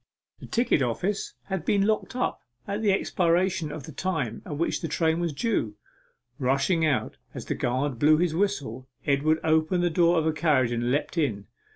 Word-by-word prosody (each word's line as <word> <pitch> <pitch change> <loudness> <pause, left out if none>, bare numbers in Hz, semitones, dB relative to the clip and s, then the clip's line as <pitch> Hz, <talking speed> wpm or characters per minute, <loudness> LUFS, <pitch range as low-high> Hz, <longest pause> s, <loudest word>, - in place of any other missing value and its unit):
The - - -10
ticket 235 - +1
office 175 - -2
had 190 -4 -4
been 200 +2 +2
locked 215 +3 -1
up 250 - -1 0.3
at 200 +2 -2
the 210 -2 +3
expiration 180 -3 +1
of 150 -1 -7
the 155 - -9
time 150 -8 -2
at 145 - -4
which 170 - -1
the 165 - -2
train 160 +1 +1
was 170 -2 -1
due. 140 - -1 0.6
Rushing 140 +6 +1
out 150 -5 0 0.2
as - - -6
the - - -1
guard 130 +1 -1
blew 155 +3 +5
his 170 -1 +1
whistle, 145 - -2 0.2
Edward 145 +3 +2
opened 160 +3 +2
the 175 - +2
door 170 +1 +3
of 160 - +1
a 160 - +2
carriage 150 -6 +2
and 120 0 -1
leapt 145 +5 -1
in. 105 -10 -1
160 Hz, 190 wpm, -26 LUFS, 140-180 Hz, 0.6 s, blew